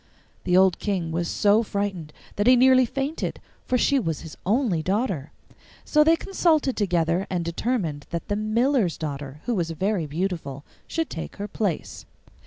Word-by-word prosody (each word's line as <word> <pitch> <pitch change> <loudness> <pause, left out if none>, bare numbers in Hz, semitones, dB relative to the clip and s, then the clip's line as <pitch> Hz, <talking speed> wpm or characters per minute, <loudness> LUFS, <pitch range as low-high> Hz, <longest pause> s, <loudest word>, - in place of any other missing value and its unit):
The 180 0 +3
old 190 -1 +4
King 185 -6 -2
was 170 +1 -1
so 205 +5 +3
frightened 200 -7 -3 0.2
that 205 +3 0
he 255 - +8
nearly 255 0 +5
fainted, 275 +6 -3 0.3
for 255 - +2
she 275 +3 +3
was 165 - -2
his 160 - -9
only 210 - +2
daughter. 190 - -1 0.5
So 300 0 +4
they 325 +2 +5
consulted 325 -7 +1
together, 175 -2 +1
and 175 -3 -2
determined 170 - -2
that 170 -1 -4
the 205 - -1
miller's 215 - +1
daughter, 145 -1 -6
who 245 - 0
was 175 -6 -1
very 180 +1 -1
beautiful, 155 -4 -3 0.2
should 325 -1 -2
take 165 - -6
her 205 0 -5
place. 200 -4 -3
195 Hz, 165 wpm, -24 LUFS, 165-245 Hz, 0.5 s, he